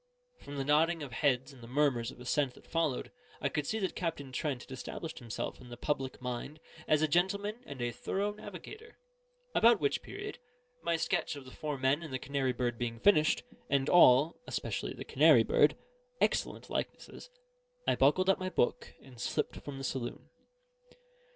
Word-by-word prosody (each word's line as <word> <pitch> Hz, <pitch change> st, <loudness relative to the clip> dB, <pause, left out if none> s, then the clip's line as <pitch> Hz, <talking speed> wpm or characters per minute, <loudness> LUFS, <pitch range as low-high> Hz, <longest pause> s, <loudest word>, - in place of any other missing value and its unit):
From 145 Hz, -, -8 dB
the 135 Hz, -, -1 dB
nodding 160 Hz, +3 st, +3 dB
of 135 Hz, -, -7 dB
heads 130 Hz, +2 st, +1 dB
and 130 Hz, -, -15 dB
the 115 Hz, -, -10 dB
murmurs 125 Hz, -3 st, +1 dB
of -, -, -11 dB
assent 130 Hz, +1 st, 0 dB
that -, -, -17 dB
followed, 160 Hz, -6 st, -1 dB, 0.3 s
I -, -, 0 dB
could 150 Hz, -2 st, -2 dB
see 220 Hz, -, 0 dB
that 190 Hz, -4 st, -1 dB
Captain 155 Hz, -6 st, -3 dB
Trent 130 Hz, -1 st, -2 dB
had -, -, -15 dB
established 155 Hz, +5 st, -6 dB
himself 120 Hz, 0 st, -5 dB
in 125 Hz, -, -12 dB
the 120 Hz, -, -8 dB
public 135 Hz, -1 st, -2 dB
mind 125 Hz, +4 st, -5 dB, 0.3 s
as 155 Hz, 0 st, +4 dB
a -, -, +4 dB
gentleman 200 Hz, +7 st, +1 dB
and 140 Hz, -, -8 dB
a 120 Hz, -, 0 dB
thorough 200 Hz, -, -2 dB
navigator: 215 Hz, -, -10 dB, 0.6 s
about 235 Hz, +1 st, +6 dB
which 420 Hz, -, +1 dB
period, 405 Hz, -3 st, -7 dB, 0.4 s
my 170 Hz, 0 st, +1 dB
sketch 165 Hz, -1 st, 0 dB
of 140 Hz, -2 st, -9 dB
the 130 Hz, -, -11 dB
four 150 Hz, 0 st, -4 dB
men 135 Hz, +4 st, +2 dB
and 155 Hz, -4 st, -7 dB
the 130 Hz, -, -1 dB
canary 135 Hz, 0 st, -1 dB
bird 120 Hz, -1 st, -2 dB
being 115 Hz, -1 st, -3 dB
finished, 155 Hz, -, +4 dB, 0.3 s
and 140 Hz, 0 st, +2 dB
all 150 Hz, -2 st, +6 dB
(especially -, -, -3 dB
the -, -, -7 dB
canary -, -, +6 dB
bird) -, -, +4 dB, 0.4 s
excellent -, -, 0 dB
likenesses, -, -, -5 dB, 0.6 s
I -, -, +4 dB
buckled 150 Hz, +8 st, +4 dB
up 195 Hz, -, +4 dB
my 185 Hz, 0 st, -2 dB
book, 120 Hz, -, 0 dB
and 125 Hz, -3 st, -12 dB
slipped 150 Hz, -, -1 dB
from 145 Hz, -2 st, -7 dB
the 135 Hz, -, -6 dB
saloon. 125 Hz, -2 st, -4 dB
145 Hz, 185 wpm, -32 LUFS, 130-170 Hz, 0.6 s, about